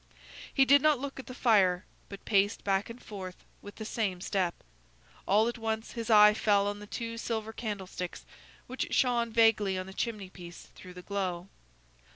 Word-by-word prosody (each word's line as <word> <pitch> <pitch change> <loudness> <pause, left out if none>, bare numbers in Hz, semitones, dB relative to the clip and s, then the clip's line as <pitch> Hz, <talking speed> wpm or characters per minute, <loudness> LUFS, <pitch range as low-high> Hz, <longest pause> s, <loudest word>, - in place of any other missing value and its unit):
He 270 - +4
did 280 +1 +6
not 305 -1 +4
look 275 +1 -6
at 265 - -9
the 255 - -7
fire, 195 -7 +3 0.2
but 200 -1 -10
paced 205 0 +2
back 195 +2 0
and 230 +2 -9
forth 190 -5 -9 0.2
with 205 - -11
the 220 - -7
same 205 -5 -2
step. 185 -1 -1 0.7
All 210 +3 +4
at 240 0 -4
once 220 0 -3
his 230 0 -5
eye 210 -1 +8
fell 205 -2 +2
on 205 0 -3
the 210 - -10
two 230 +1 -5
silver 220 -1 -3
candlesticks, 195 -5 -5 0.4
which 255 +1 -4
shone 240 -2 +2
vaguely 220 -4 +3
on 185 - -4
the 190 - -10
chimney 205 -3 -4
piece, 175 -2 -11
through 180 -1 -12
the 180 - -10
glow. 185 -2 -3
210 Hz, 185 wpm, -30 LUFS, 190-230 Hz, 0.7 s, eye